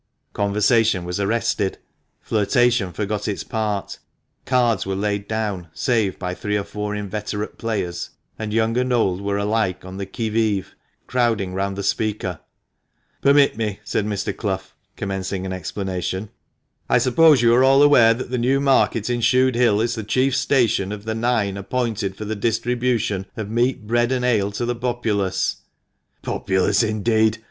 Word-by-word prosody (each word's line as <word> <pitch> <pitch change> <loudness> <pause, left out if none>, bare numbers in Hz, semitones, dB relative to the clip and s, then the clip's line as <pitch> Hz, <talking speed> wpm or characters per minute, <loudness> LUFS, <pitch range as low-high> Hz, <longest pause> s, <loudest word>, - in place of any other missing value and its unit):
Conversation 105 -1 +2
was 90 +2 -3
arrested, 110 -1 0 0.4
flirtation 115 -1 +2
forgot 105 +2 -3
its 105 - -2
part, 105 -3 -3 0.5
cards 120 -5 +2
were 95 0 -3
laid 100 0 -2
down, 105 -5 -3
save 105 +1 0
by 90 -1 -4
three 105 +3 -2
or 100 - -2
four 105 +1 -4
inveterate 105 +1 -4
players, 100 -6 -3 0.3
and 110 -1 -4
young 115 +1 +1
and 125 0 0
old 100 -6 +1
were 100 0 -1
alike 100 -3 -1
on 95 +1 -8
the 100 -1 -4
qui 110 +2 -3
mve, 105 -3 +1 0.4
crowding 115 -7 0
round 100 +1 -2
the 100 - -4
speaker. 100 -4 -1 0.4
" - - -45
Permit 140 0 +4
me," 105 -3 -2
said 105 - -1
Mr. 100 -1 -2
Clough, 95 -4 -2 0.3
commencing 95 -2 -3
an 95 - -3
explanation. 95 +2 -4 0.3
" - - -47
I - - +5
suppose 140 0 +5
you 115 0 +5
are 125 +2 +5
all 135 +2 +6
aware 120 -6 +6
that 125 +1 -6
the 125 - 0
new 130 +3 +2
market 135 -5 +2
in 120 -1 0
Shude 130 +2 +3
Hill 115 -3 +3
is 115 +1 0
the 110 - -4
chief 130 +5 +1
station 120 -7 +2
of 105 0 -7
the 110 - -2
nine 110 -4 0
appointed 105 -2 -2
for 105 - -6
the 110 +1 -3
distribution 115 -2 0
of 110 -1 -5
meat, 120 0 0
bread, 120 +2 +1
and 125 -1 0
ale 105 -5 +2
to 120 - -2
the 120 - 0
populace? 115 -6 -1 0.2
" - - -51
" - - -48
Populace, 95 +2 +1
indeed 110 0 +1
110 Hz, 170 wpm, -22 LUFS, 100-120 Hz, 0.5 s, all